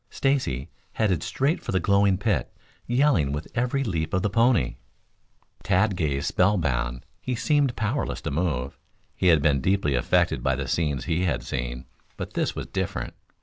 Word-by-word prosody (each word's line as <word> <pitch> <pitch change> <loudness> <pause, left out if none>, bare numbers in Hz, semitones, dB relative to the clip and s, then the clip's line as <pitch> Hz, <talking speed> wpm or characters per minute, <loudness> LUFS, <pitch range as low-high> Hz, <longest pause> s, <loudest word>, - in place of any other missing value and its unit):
Stacy 130 - -1 0.2
headed 95 -8 +1
straight 140 +6 0
for - - -4
the 95 - +2
glowing 100 +1 +3
pit, 100 0 0 0.4
yelling 120 - +3
with 75 +2 -4
every 125 +3 0
leap 85 -6 -2
of 95 - 0
the 105 - 0
pony. 115 - +2 0.8
Tad 95 +2 +2
gazed 70 -5 -1
spellbound. 65 -11 +1 0.2
He 125 - -2
seemed 140 -1 +1
powerless 110 +5 -2
to 80 - -3
move. 70 -4 -2 0.4
He 95 - +1
had 80 -5 +5
been 70 -3 +3
deeply 95 -4 +1
affected 60 - +2
by 65 - +1
the 70 0 -4
scenes 75 -2 -1
he 85 +3 0
had 85 - -1
seen; 60 -1 -4 0.3
but - - -6
this - - -1
was - - -4
different. - - -3
90 Hz, 165 wpm, -25 LUFS, 70-115 Hz, 0.8 s, had